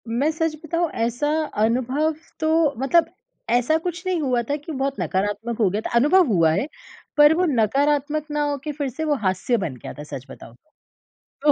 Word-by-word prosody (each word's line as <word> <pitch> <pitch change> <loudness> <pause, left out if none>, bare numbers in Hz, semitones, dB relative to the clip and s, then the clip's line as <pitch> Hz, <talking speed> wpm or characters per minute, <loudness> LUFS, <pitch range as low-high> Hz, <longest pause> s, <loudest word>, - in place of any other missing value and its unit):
मैं 240 +7 +1
सच 320 0 -1
बताऊँ 335 +2 0 0.2
ऐसा 245 +5 -1 0.4
अनुभव 260 +7 +1 0.2
तो 315 - 0 0.3
मतलब 320 +5 +3 0.4
ऐसा 245 +6 +3
कुछ 355 +2 -5
नहीं 360 -3 0
हुआ 250 -4 +1
था 285 - +1
कि 295 +2 -8
बहुत 275 -1 -2
नकारात्मक 205 +4 -2
हो 205 - +4
गया 205 +4 -2
था। - - -4
अनुभव 315 +10 +5
हुआ 170 -8 +3
है, 205 - 0 0.5
पर 295 +1 +7
वो 365 +2 +2
नकारात्मक 290 +5 +1
ना 295 0 0
हो 285 - -1
के 305 - -3
फिर 285 -2 -3
से 315 +6 -5
वो 300 -1 +2
हास्य 190 +6 +1
बन 165 - -3
गया 125 - -9
था 150 - -9
सच 140 -3 -8
बताऊँ 115 -3 -12 0.9
तो। - - +9
275 Hz, 195 wpm, -23 LUFS, 225-310 Hz, 0.9 s, तो